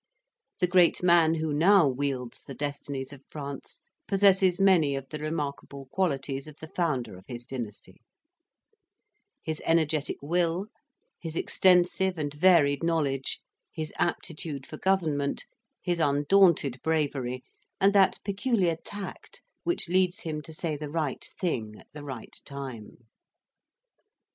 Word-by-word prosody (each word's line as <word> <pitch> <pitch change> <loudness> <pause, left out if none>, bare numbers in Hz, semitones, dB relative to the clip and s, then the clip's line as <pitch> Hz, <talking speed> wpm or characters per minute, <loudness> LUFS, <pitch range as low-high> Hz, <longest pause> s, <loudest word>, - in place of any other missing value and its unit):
The 180 - +4
great 180 -1 +4
man 170 -2 +5
who 160 -2 -1
now 180 +4 +6
wields 130 -2 -3
the 135 - -9
destinies 140 -1 -4
of 140 -1 -13
France 140 -2 -8 0.3
possesses 190 -2 +4
many 175 -8 +4
of 135 -1 -5
the 150 - -6
remarkable 145 -3 -4
qualities 140 -6 -1
of 155 - -11
the 160 - -9
founder 150 - -1
of 95 - -19
his 120 -1 -7
dynasty: 110 -7 -7 1.4
his 160 -1 -2
energetic 160 -3 +1
will, 170 +4 0 0.5
his 165 -2 -6
extensive 180 +1 +3
and 145 -2 -3
varied 150 -3 +4
knowledge, 150 -5 0 0.3
his 155 -1 -5
aptitude 155 -5 -2
for 155 - -9
government, 155 -7 0 0.4
his 175 -2 0
undaunted 145 -2 +3
bravery, 140 -6 -1 0.4
and 195 +1 +4
that 195 -2 +5
peculiar 200 -4 +1
tact 205 -1 -8 0.2
which 345 - 0
leads 185 +1 +2
him 155 -2 -4
to 160 - -11
say 160 0 -3
the 150 0 -6
right 150 -3 -2 0.2
thing 115 - -2
at - - -18
the 150 -1 -8
right 135 -5 -8
time. 130 -4 -8
155 Hz, 130 wpm, -28 LUFS, 140-175 Hz, 1.4 s, now